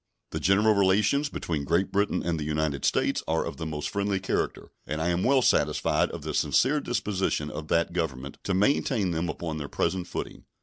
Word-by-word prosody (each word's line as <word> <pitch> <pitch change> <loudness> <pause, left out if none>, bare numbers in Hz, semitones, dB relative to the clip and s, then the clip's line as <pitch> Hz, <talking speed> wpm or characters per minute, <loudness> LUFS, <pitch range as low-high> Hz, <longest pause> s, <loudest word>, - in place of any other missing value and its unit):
The - - -3
general 105 +4 +4
relations 105 +9 +3
between 80 - -3
Great 85 +6 +1
Britain 100 +1 +1
and 85 -2 0
the - - -2
United 75 -2 -1
States - - +1
are 80 0 +1
of - - -6
the 80 - -4
most 75 -1 -3
friendly 100 -1 -1
character, 95 - -2 0.2
and 75 - -3
I 80 +2 0
am 85 +1 0
well 130 -1 +4
satisfied - - +2
of - - -7
the - - -4
sincere 145 +4 +2
disposition 105 - -1
of 80 - -6
that 85 +1 +1
Government 70 -6 -3
to 95 - 0
maintain 105 -1 +2
them 85 +1 -1
upon 80 -2 -4
their 70 - -5
present 95 -2 -1
footing. - - -6
90 Hz, 200 wpm, -27 LUFS, 80-100 Hz, 0.2 s, general